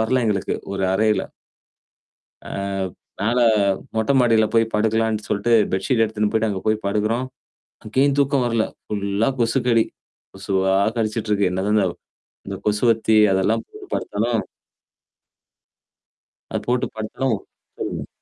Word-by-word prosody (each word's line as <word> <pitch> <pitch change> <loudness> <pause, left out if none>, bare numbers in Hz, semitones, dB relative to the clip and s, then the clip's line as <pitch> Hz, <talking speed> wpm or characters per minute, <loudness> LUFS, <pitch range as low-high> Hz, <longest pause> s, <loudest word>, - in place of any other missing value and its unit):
வரல 125 +3 +2
எங்களுக்கு 100 -3 0 0.2
ஒரு 95 -1 -1
அறையில. 110 +2 +2 1.2
அ - - -7 0.7
மேல 115 +5 +1 0.6
மொட்டை 110 +5 +1
மாடில 115 -3 +4
போய் 115 0 +4
படுக்கலான்னு 110 0 +1
சொல்லட்டு 105 +3 +1 0.2
பெட்ஷீட் 115 +5 +1
எடுத்துன்னு 105 -1 0
போயி்டு 110 0 +2
அங்க 95 -2 -2
போய் 110 - +3
படுக்குறோம். 110 +5 0 0.6
அங்கேயும் 135 +6 +1
தூக்கம் 140 -2 +2
வரல. 115 -2 +1 0.2
ஃபுல்லா 100 +2 0
கொசுக்கடி. 115 -1 +2 0.5
கொசுவா 95 -1 0 0.2
கடிச்சுட்டு 110 0 -1
இருக்கு. 100 -3 +2
என்னதந்த 100 +3 +1
தவ் 85 - -5 0.5
இந்த 100 0 -4
கொசுவத்தி 110 +1 +2 0.2
அதெல்லாம் 105 +4 +1
போட்டு 420 -2 -13
படுத்தாலும் 115 +1 -1 2.1
அ - - +3
போட்டு 125 +1 +1
படுத்தாலும் 110 +4 -2 0.4
சொல்லுங்க. - - -4
110 Hz, 120 wpm, -22 LUFS, 105-115 Hz, 2.1 s, மாடில